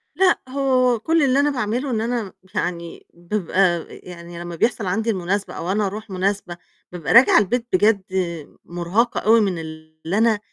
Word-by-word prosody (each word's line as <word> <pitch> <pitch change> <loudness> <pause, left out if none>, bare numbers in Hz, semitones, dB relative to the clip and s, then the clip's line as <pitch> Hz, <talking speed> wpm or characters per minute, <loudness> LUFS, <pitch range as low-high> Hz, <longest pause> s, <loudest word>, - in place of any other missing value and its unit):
لأ، 370 +2 +3
هو 255 -3 +2
كُلّ 325 +6 +1
اللي 270 0 +3
أنا 290 +1 +3
باعمله 250 +1 -2
إن 220 -2 -1
أنا 235 0 -1
م 195 - -11 0.2
يعني 170 -1 -4
بابقى 175 +1 -3 0.2
آآ 170 - -6
يعني 170 -1 -11
لمّا 175 0 -6
بيحصل 225 +3 0
عندي 220 +5 -1
المناسبة 195 0 -2
أو 175 +3 -4
أنا 210 0 +1
أروح 215 +3 -7
مناسبة، 190 -1 -2 0.3
بابقى 175 -4 -2
راجعة 235 +3 +7
البيت 235 +4 -1
بجد 205 +2 +3 0.6
مُرهَقة 175 +8 -1
أوي 225 +1 +4
من 190 -5 -1
اللي 155 +3 -6
أنا 225 -2 +3
205 Hz, 170 wpm, -21 LUFS, 175-235 Hz, 0.6 s, راجعة